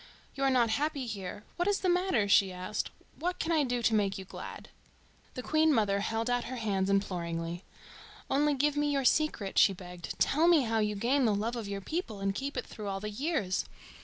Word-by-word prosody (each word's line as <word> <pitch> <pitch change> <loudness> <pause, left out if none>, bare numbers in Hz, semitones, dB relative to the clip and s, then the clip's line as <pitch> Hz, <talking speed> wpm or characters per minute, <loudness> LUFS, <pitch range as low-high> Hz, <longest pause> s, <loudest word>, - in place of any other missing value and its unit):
"You 275 - -3
are - - +4
not 240 -4 +3
happy 285 +2 -1
here. 205 -3 -6
What 350 +1 0
is 405 -1 +1
the 375 - 0
matter?" 355 - +2
she 195 -1 +5
asked. 185 +4 -3 0.3
"What 355 +3 -1
can 335 - -2
I 315 -3 +3
do 245 -2 -1
to 230 - +3
make 200 -3 +1
you 190 - -7
glad?" - - -9 0.7
The 255 - -5
Queen 315 +2 +3
mother 205 -6 +2
held 225 +3 -1
out 245 -1 0
her 255 - -5
hands 200 -5 -1
imploringly. 175 -3 -1 0.6
"Only 290 +1 +2
give 290 +2 +1
me 295 0 +1
your 275 -2 0
secret," 245 -9 +2
she 195 - +6
begged. 180 -1 -8
"Tell 315 +4 +3
me 335 -5 +6
how 225 -1 0
you 210 -1 0
gain 250 +6 +2
the 215 -3 +3
love 225 +4 -2
of 230 -4 -4
your 200 0 -4
people 235 - -4
and 195 0 0
keep 275 +7 -4
it - - -2
through 215 -2 -8
all 195 -1 -2
the 210 +1 -5
years. 220 - -1
225 Hz, 220 wpm, -30 LUFS, 200-285 Hz, 0.7 s, she